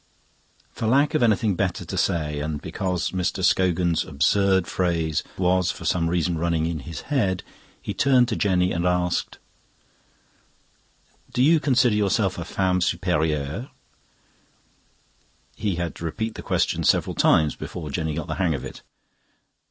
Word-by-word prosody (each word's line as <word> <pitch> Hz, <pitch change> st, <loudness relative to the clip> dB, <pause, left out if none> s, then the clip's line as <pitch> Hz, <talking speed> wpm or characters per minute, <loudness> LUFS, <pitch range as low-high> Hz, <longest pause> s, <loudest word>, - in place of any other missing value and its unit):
For 110 Hz, -, -4 dB
lack 140 Hz, +5 st, +3 dB
of 155 Hz, -, +1 dB
anything 110 Hz, -2 st, +3 dB
better 90 Hz, 0 st, -2 dB
to -, -, -5 dB
say, 75 Hz, -3 st, 0 dB
and 75 Hz, 0 st, -3 dB
because 90 Hz, +1 st, -2 dB
Mr. 95 Hz, +1 st, -2 dB
Scogan's 90 Hz, -3 st, +2 dB
absurd 95 Hz, +5 st, +2 dB
phrase 85 Hz, -5 st, 0 dB, 0.2 s
was 90 Hz, -1 st, +2 dB
for -, -, -5 dB
some 85 Hz, -2 st, +1 dB
reason 85 Hz, -1 st, 0 dB
running 85 Hz, -1 st, 0 dB
in 80 Hz, -1 st, -2 dB
his 75 Hz, +2 st, -7 dB
head, 100 Hz, -11 st, -1 dB, 0.4 s
he -, -, -5 dB
turned 130 Hz, -3 st, +3 dB
to 110 Hz, -, -1 dB
Jenny 90 Hz, -3 st, +1 dB
and 85 Hz, +1 st, 0 dB
asked: 90 Hz, 0 st, -1 dB, 1.9 s
"Do 125 Hz, -, +1 dB
you 160 Hz, +3 st, +5 dB
consider 130 Hz, -5 st, +3 dB
yourself 100 Hz, -2 st, +1 dB
a 85 Hz, -, -5 dB
femme 90 Hz, 0 st, 0 dB
superieure?" 75 Hz, -, -1 dB, 1.9 s
He 100 Hz, -4 st, -2 dB
had 85 Hz, -1 st, -3 dB
to 85 Hz, -, -6 dB
repeat 110 Hz, +7 st, -3 dB
the -, -, -8 dB
question -, -, 0 dB
several -, -, +2 dB
times 75 Hz, -2 st, +3 dB
before 80 Hz, -5 st, -7 dB
Jenny 80 Hz, 0 st, -2 dB
got -, -, -3 dB
the -, -, -4 dB
hang 85 Hz, -5 st, +2 dB
of 65 Hz, -, -6 dB
it. -, -, -9 dB
90 Hz, 150 wpm, -24 LUFS, 80-100 Hz, 1.9 s, you